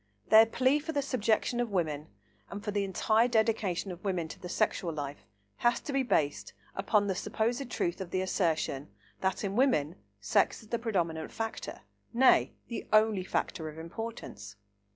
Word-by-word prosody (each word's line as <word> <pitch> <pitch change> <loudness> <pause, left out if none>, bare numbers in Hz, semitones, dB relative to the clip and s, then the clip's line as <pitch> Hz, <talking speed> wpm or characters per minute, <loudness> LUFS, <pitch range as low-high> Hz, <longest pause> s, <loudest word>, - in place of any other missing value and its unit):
Their 220 +1 +8
plea 260 +5 +2
for 320 +2 -5
the 285 -1 0
subjection 240 -1 +1
of 240 -1 0
women 155 -6 -1 0.4
and 200 +1 -7
for 210 - -2
the 205 -1 0
entire 215 +4 +2
dedication 220 -5 +1
of 175 0 -9
women 180 -5 -1
to - - -9
the 180 - -7
sexual 185 -3 0
life 145 -2 -6 0.3
has 240 0 +2
to 285 - -5
be 275 - +3
based 150 - 0 0.2
upon 205 +1 +2
the 195 - 0
supposed 235 +7 -1
truth 175 -6 -1
of 185 - -5
the 185 +1 0
assertion 160 -7 0 0.3
that, 190 +2 -1
in 195 -1 -2
women, 190 - +2 0.2
sex - - +1
is 215 - -17
the 235 - -1
predominant 170 -8 -1
factor, 225 0 -5 0.3
nay, 260 +2 +5 0.2
the 235 - -5
only 215 -3 +4
factor 160 -3 -2
of 155 - -11
importance. 165 - -7
205 Hz, 170 wpm, -30 LUFS, 170-230 Hz, 0.4 s, Their